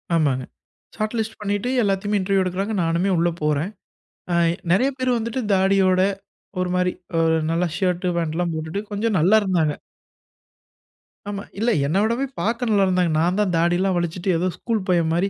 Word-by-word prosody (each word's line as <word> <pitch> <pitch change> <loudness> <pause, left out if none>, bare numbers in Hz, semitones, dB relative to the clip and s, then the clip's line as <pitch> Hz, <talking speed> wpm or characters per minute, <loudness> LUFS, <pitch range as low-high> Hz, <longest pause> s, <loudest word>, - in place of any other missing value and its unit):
ஆமாங்க. 140 -5 +1 0.5
Shot 215 +2 -2
list 220 0 -3
பண்ணிட்டு 205 +3 -1
எல்லாத்தையும் 205 +1 0
இன்டெர்வியூ 195 0 +1
எடுக்குறாங்க. 190 +4 -2
நானுமே 170 +4 +1
உள்ள 170 +1 +2
போறேன். 150 +5 0 0.6
அ - - +2 0.4
நெறைய 245 +10 +3
பேர் 255 -1 0
வந்துட்டு 230 +3 -3
தாடியோட 190 -1 +3 0.6
ஒரு 185 0 0
மாரி 180 0 +2 0.3
அ - - +3 0.3
நல்லா 170 +2 +1
ஷர்ட், 180 -1 0
ஃபேன்ட்லாம் 170 +1 -1
போட்டுட்டு 160 +4 -4
கொஞ்சம் 210 +1 0
நல்லா 185 +7 +4
இருந்தாங்க. 170 -6 +1 1.6
ஆமா. 200 -1 -4 0.2
இல்ல, 235 +3 +2 0.2
என்ன 160 +6 0
விடவே 235 +5 0 0.2
பார்க்க 230 +3 -1
நல்லா 200 -2 +4
இருந்தாங்க. 180 -2 +2
நான் 175 +4 +1
தான் 200 -4 +1
தாடிலாம் 175 +3 +2
வளிச்சிட்டு, 175 +2 -2
ஏதோ 180 +3 0
ஸ்கூல் 225 +2 -1
பையன் 170 -3 +2
மாரி, 180 +4 +1
185 Hz, 155 wpm, -22 LUFS, 170-205 Hz, 1.6 s, நல்லா